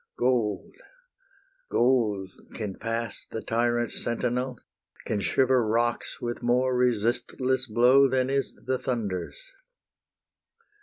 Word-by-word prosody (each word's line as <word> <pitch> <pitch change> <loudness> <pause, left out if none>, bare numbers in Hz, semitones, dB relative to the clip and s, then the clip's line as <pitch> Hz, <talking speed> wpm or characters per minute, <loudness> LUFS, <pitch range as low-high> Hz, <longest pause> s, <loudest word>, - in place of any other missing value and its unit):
Gold, 120 -5 0 1.0
gold 110 -7 +2 0.2
can 105 -4 -5
pass 115 -1 -3
the 110 - -6
tyrant's 120 0 0
sentinel, 125 +2 -1 0.5
Can 105 - -1
shiver 130 +2 +3
rocks 115 +2 -1
with 120 0 -4
more 125 +1 +2
resistless 125 +2 0
blow 125 +5 +5
Than 130 -1 +1
is 135 0 -1
the 130 0 0
thunder's. 115 - -3
120 Hz, 100 wpm, -27 LUFS, 115-130 Hz, 1.0 s, blow